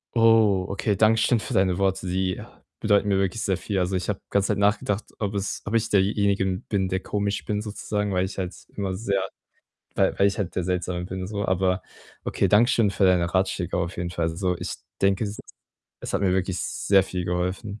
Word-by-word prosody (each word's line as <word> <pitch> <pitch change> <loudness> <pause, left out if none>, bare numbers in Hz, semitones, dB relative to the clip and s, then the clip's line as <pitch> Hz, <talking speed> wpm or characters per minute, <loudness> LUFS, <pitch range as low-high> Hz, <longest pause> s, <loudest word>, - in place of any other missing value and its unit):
Oh, 110 -5 +5
okay, 100 +1 -1
danke 110 +2 +5
schön 120 0 +3
für 125 - -5
deine 95 -3 +2
Worte. 95 -1 0
Die 95 0 -1 0.4
bedeuten 105 -1 +3
mir 100 -1 +2
wirklich 95 +2 0
sehr 95 - +1
viel. 95 +1 -2
Also, 90 +1 0
ich 90 +2 -2
habe 105 - -1
ganze 100 0 +2
Zeit 105 - +1
nachgedacht, 100 0 +1
ob 105 -2 -2
es 100 0 -2
ob 100 - -5
ich 115 -1 +2
derjenige 100 0 +2 0.2
bin, 95 -3 0
der 95 0 0
komisch 100 +1 -2
bin 105 0 -1
sozusagen, 105 -1 -3
weil 90 0 +1
ich 95 - -7
halt 90 -1 -3 0.2
immer 95 -2 -2
sehr 100 0 -1 0.7
weil - - +2
weil 100 - +5
ich 100 - -1
halt 100 -5 -3
der 90 - 0
Seltsame 90 0 -2
bin 95 +1 -5
so. 100 0 -3
Aber 95 0 +1 0.4
okay, 100 - +1
danke 105 +5 +5
schön 110 -4 +3
für 100 0 -1
deine 90 -2 +3
Ratschläge 95 -2 0
auf 85 0 -2
jeden 85 0 -3
Fall 85 -1 -1
so. 90 +2 -1
Ich - - -4 0.3
denke, 95 +2 +2
es 100 - -3
ist 105 - -9 0.6
es - - -5
hat 100 - +1
mir 95 -2 +2
wirklich 95 -1 0
sehr 95 -2 +2
viel 90 -2 -4
geholfen. 90 +4 -2
95 Hz, 215 wpm, -25 LUFS, 95-105 Hz, 0.7 s, Oh